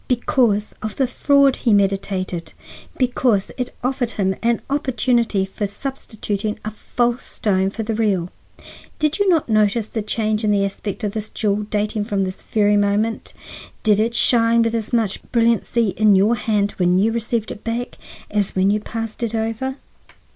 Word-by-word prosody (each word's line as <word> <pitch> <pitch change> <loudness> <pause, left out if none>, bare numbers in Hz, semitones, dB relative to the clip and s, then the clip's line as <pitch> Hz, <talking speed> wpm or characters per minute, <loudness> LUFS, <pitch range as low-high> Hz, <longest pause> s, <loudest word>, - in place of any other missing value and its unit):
"Because 240 -4 +1
of 215 -1 -4
the 270 - +2
fraud 275 +2 +3
he 230 -4 +3
meditated. 195 -3 -1 0.4
Because 245 -5 +1
it 250 -1 -3
offered 255 -1 0
him 190 -2 0
an 235 0 +1
opportunity 245 -7 +1
for 200 +2 -4
substituting 215 -3 -4
a 215 - -3
false 240 +3 -1
stone 190 -2 0
for 220 +3 -5
the 220 +1 -2
real. 200 -6 0 0.7
Did 305 +2 0
you 405 -1 +3
not 330 -5 +2
notice 215 0 +1
a 220 - 0
change 215 +1 -1
in 215 - +2
the 200 -1 +2
aspect 200 +1 -5
of 205 - 0
this 215 0 -4
jewel 210 -1 -1
dating 210 0 -1
from 200 -3 0
this 185 0 -5
very 210 -1 +2
moment? 205 +2 0 0.5
Did 210 -2 +4
it 230 +2 +1
shine 230 -1 +4
with 230 0 0
as 225 -2 -2
much 225 -5 0
brilliancy 230 -1 +2
in 210 +1 +4
your 200 +5 +4
hand 210 -2 0
when 180 0 +3
you 210 +4 +3
received 230 -1 -2
it 210 - -9
back 235 +2 -4 0.3
as 205 -2 0
when 190 +1 +3
you 210 - +1
passed 225 +1 -6
it 230 -1 -1
over?" 225 +4 -2
220 Hz, 170 wpm, -20 LUFS, 205-235 Hz, 0.7 s, Did